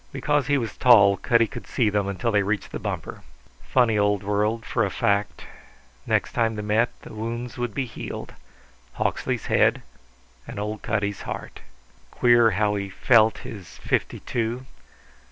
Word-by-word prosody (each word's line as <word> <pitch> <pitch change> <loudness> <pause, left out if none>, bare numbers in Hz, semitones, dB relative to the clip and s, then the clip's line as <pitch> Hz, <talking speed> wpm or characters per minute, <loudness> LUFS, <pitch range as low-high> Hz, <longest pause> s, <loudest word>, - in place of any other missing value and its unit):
Because 145 +1 0
he 145 -1 +3
was 115 -4 -3
tall 105 -6 +6
Cutty 115 +4 +3
could - - -9
see 120 - +1
them 100 -1 0
until 100 +4 -1
they 105 -1 +3
reached 100 +1 -2
the - - -5
bumper. - - -5 0.4
Funny 115 -4 +2
old 105 -1 +1
world, 105 +3 0
for 115 - 0
a 100 - 0
fact. 100 +2 -1 0.6
Next - - +1
time 115 -1 +1
they 105 - -4
met 110 +3 +2
the - - -11
wounds 115 +2 -5
would 120 -4 -3
be 135 - -1
healed 120 - -7 0.6
Hawksley's - - -2
head - - +2 0.6
and - - -8
old 105 +1 -4
Cutty's 100 -2 -2
heart. - - -7 0.5
Queer 120 -2 +4
how 105 +1 +1
he 100 -1 -3
felt 110 +2 +4
his 105 -8 -9
fifty - - -2
two. 120 +2 -3
110 Hz, 160 wpm, -24 LUFS, 105-120 Hz, 0.6 s, tall